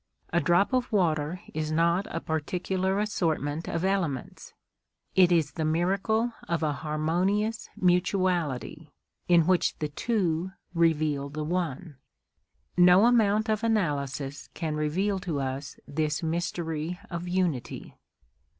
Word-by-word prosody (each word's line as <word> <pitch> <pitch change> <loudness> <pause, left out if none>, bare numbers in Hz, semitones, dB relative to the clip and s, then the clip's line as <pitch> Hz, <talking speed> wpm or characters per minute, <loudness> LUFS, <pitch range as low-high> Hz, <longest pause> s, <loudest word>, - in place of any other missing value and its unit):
A 170 - +4
drop 175 - +3
of 255 -1 +1
water 170 -3 +1
is 155 0 -2
not 170 +5 +2
a 165 - -3
particular 185 +5 -1
assortment 165 -7 -1
of 170 +2 -1
elements; 180 -9 -2 0.6
it 185 -2 +6
is 160 -4 +2
the 160 - -3
miracle 195 +9 +1
of 170 -1 -1
a 150 -1 +1
harmonious 175 +9 -1
mutuality, 175 -5 0 0.3
in 170 -2 +5
which 185 0 +2
the 150 - -3
two 185 0 -1 0.2
reveal 155 -4 +1
the 150 +2 -4
One. 165 -2 -3 0.8
No 180 +3 +7
amount 220 -3 +3
of 215 0 0
analysis 145 - -1
can 155 -2 -2
reveal 185 +7 0
to 170 -6 -3
us 135 +1 -4
this 150 +2 -1
mystery 165 0 -2
of 170 0 -4
unity. 175 -8 -2
170 Hz, 125 wpm, -27 LUFS, 155-190 Hz, 0.8 s, No